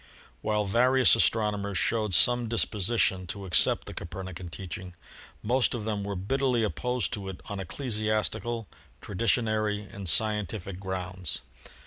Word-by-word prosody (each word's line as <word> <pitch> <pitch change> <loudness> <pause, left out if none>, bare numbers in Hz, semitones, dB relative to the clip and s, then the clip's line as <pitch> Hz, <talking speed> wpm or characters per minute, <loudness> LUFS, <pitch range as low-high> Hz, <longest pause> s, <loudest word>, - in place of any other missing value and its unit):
While 105 -1 0
various 125 +5 +5
astronomers 105 -3 +1
showed 105 -3 +1
some 120 +2 +5
disposition 105 -4 +1
to 100 +2 -5
accept 90 - +4
the - - -7
Copernican 90 0 -7
teaching, 95 +1 -7 0.5
most 125 +3 +2
of 110 -3 -4
them 105 -2 -2
were 100 0 -3
bitterly 125 +5 +1
opposed 125 +3 -1
to 100 -4 -4
it 95 - -7
on 100 -2 -4
ecclesiastical, 110 +1 -2 0.3
traditionary 110 - 0
and 100 -3 -5
scientific 100 0 0
grounds. 95 -2 -3
105 Hz, 125 wpm, -28 LUFS, 95-115 Hz, 0.5 s, various